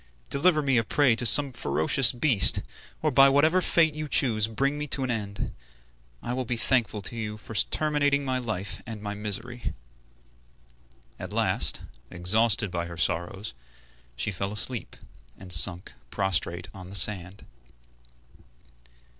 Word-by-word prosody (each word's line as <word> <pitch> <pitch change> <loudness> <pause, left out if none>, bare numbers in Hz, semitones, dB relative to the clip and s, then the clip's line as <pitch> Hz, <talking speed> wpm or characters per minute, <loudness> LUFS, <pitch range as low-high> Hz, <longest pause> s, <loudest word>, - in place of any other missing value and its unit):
Deliver 155 +1 +2
me 135 -3 +1
a 115 - +2
prey 130 +1 +2
to 120 +1 +1
some 140 +3 +6
ferocious 115 - +2
beast, 120 - +4 0.4
or 155 - +1
by 135 +1 +6
whatever 155 +6 +3
fate 160 -3 +2
you 155 0 -6
choose 110 -6 +3
bring 140 +6 -1
me 150 0 -5
to 140 - 0
an 130 - -2
end. 100 -3 -5 0.7
I 120 - -4
will 130 +1 -2
be 120 0 -4
thankful 115 -4 0
to 120 - -4
you 105 -2 -5
for 110 - -11
terminating 145 +5 0
my 130 -1 -1
life 105 -5 -5
and 110 -2 -7
my 105 0 -6
misery." 105 - -6 1.4
At - - -7
last, - - +1 0.3
exhausted 100 +2 +1
by 85 -1 -4
her 85 -1 -10
sorrows, 85 +3 -3 0.6
she 60 +12 -3
fell 100 +1 -4
asleep, 105 +3 -1 0.4
and 95 -2 -5
sunk 85 +1 +2 0.2
prostrate 90 -1 -2
on 95 -3 -11
the 100 - -8
sand. 95 +1 +2
110 Hz, 145 wpm, -26 LUFS, 95-135 Hz, 1.4 s, some